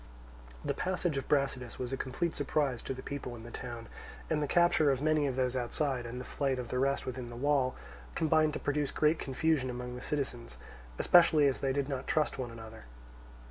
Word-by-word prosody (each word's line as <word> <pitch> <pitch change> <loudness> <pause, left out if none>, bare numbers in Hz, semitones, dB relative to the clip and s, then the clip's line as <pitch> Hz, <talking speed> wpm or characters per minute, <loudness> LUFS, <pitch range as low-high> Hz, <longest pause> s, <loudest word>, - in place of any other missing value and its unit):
The - - +1
passage 180 -4 -1
of 135 - -3
Brasidas 135 -4 0
was 125 +1 -4
a - - +2
complete 135 +6 -2
surprise 140 -3 0
to - - -4
the 130 - -8
people 140 -3 -5
in 115 - -10
the 120 - -9
town; 120 -2 -6 0.5
and 155 -1 +2
the 145 - 0
capture 175 -3 +4
of 135 -2 +2
many 155 0 +2
of 130 - -2
those 130 -1 0
outside, 125 0 -1
and 120 +2 -6
the 125 - -6
flight 135 -2 -1
of 125 -2 -5
the 125 - -1
rest 140 +1 +1
within 125 -1 -5
the 120 - -8
wall, 135 0 +1 0.4
combined 155 -1 +3
to - - -3
produce 145 0 0
great 155 +1 +2
confusion 135 0 +1
among 125 0 -5
the 125 - -7
citizens; 130 - -3 0.4
especially 160 -4 +6
as 135 -2 +2
they 135 - 0
did 140 0 0
not 135 -3 -4
trust 155 -3 +1
one 125 -2 -3
another. 110 - -10
135 Hz, 210 wpm, -32 LUFS, 125-150 Hz, 0.5 s, especially